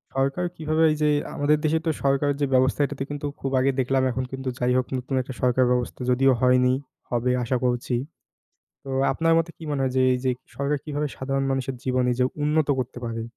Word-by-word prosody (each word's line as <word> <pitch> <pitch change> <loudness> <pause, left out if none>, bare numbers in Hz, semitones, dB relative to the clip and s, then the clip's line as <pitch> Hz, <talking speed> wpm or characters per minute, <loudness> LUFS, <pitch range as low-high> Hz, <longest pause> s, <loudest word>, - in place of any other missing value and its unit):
সরকার 140 +7 0
কিভাবে 155 +1 0
এইযে 150 0 +1 0.3
আমাদের 150 +1 +3
দেশের 160 +1 +1
তো 160 - +2
সরকারের 140 +1 +2
যে - - +4
ব্যবস্থা, 130 +2 +3
এটাতে 135 -1 -4
কিন্তু 145 0 -5
খুব 135 - -3
আগে 135 +1 +3
দেখলাম 130 +1 +2
এখন 130 +2 -2
কিন্তু 135 -1 -4
যাই 125 0 +1
হোক 130 - +1
নতুন 130 +2 -3
একটা 130 +1 -7
সরকার 125 0 +3
ব্যবস্থা 125 +1 -1
যদিও 135 +2 +4
হয়নি, 125 0 +4 0.4
হবে 120 +1 +1
আশা 125 +2 0
করছি। 120 0 0 0.9
তো - - -10 0.2
আপনার 165 +4 +2
মতে 165 +1 -1
কি 165 - -10
মনে 140 -2 -1
হয় 130 -1 0
যে, 130 - +4
এইযে 130 +1 0 0.3
সরকার 140 +1 0
কিভাবে 150 0 -2
সাধারণ 135 +1 -1
মানুষের 135 0 -1
জীবন 130 -1 +1
এইযে 125 +1 +1 0.2
উন্নত 150 0 +2
করতে 125 -1 -4
পারে? 115 0 -4
135 Hz, 195 wpm, -24 LUFS, 125-145 Hz, 0.9 s, যে